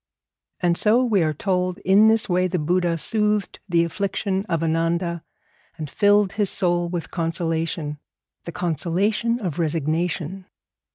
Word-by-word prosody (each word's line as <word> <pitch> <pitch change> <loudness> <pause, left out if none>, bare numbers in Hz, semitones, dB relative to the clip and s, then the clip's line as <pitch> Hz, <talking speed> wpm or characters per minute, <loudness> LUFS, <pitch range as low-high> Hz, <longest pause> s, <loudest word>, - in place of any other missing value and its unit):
And 175 -1 +2
so, 235 +4 +3
we 210 -6 +2
are 155 -1 +1
told, 180 +3 -1
in 200 +3 +6
this 225 +1 +3
way 185 -1 +1
the 180 0 -2
Buddha 175 +1 0
soothed 210 +2 0
the 170 -1 +3
affliction 195 +3 -2
of 165 -2 0
Ananda, 165 +1 -1 0.5
and 155 -4 -6
filled 205 +1 +3
his 205 -3 0
soul 175 -2 0
with 170 -2 -5
consolation 165 -2 -2 0.5
the 170 - -5
consolation 180 - -1
of 180 -6 -4
resignation. 165 +3 -2
175 Hz, 135 wpm, -23 LUFS, 165-200 Hz, 0.5 s, in